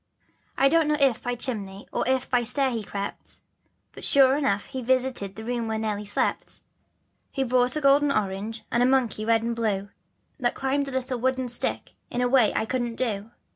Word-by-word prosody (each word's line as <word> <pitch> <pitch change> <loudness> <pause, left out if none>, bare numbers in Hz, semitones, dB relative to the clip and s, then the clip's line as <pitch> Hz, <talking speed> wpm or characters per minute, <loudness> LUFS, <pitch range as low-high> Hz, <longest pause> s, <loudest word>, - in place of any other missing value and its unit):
1 270 - +5
don't 330 -2 +4
know 300 0 +2
if 270 -5 +3
by 245 0 -2
chimney 205 -6 -2
or - - -1
if 260 0 +1
by 245 -1 +2
stair 260 +3 +1
he 230 -2 -2
crept, 200 -1 -6 0.5
But - - -11
sure 270 -1 +5
enough 205 -9 0
he 260 - -6
visited 250 -5 0
the 220 - -8
room 235 0 -2
where 220 0 -1
Nelly 210 -1 -3
slept. 205 - -2 0.7
He 270 - -1
brought 250 +1 +2
a 305 - -1
golden 280 +1 +4
orange, 210 0 -2
and 235 - +2
a - - +5
monkey 255 -5 +1
red 225 0 +3
and 235 0 -1
blue, 205 -4 -1 0.5
That 240 -2 0
climbed 275 +1 -1
a - - -4
little 255 -1 -2
wooden 260 0 0
stick 240 - -2 0.2
in 245 - -3
a 250 - +2
way 245 -4 +4
I - - +1
couldn't 240 -1 -2
do. 220 -4 -2
245 Hz, 200 wpm, -25 LUFS, 220-260 Hz, 0.7 s, 1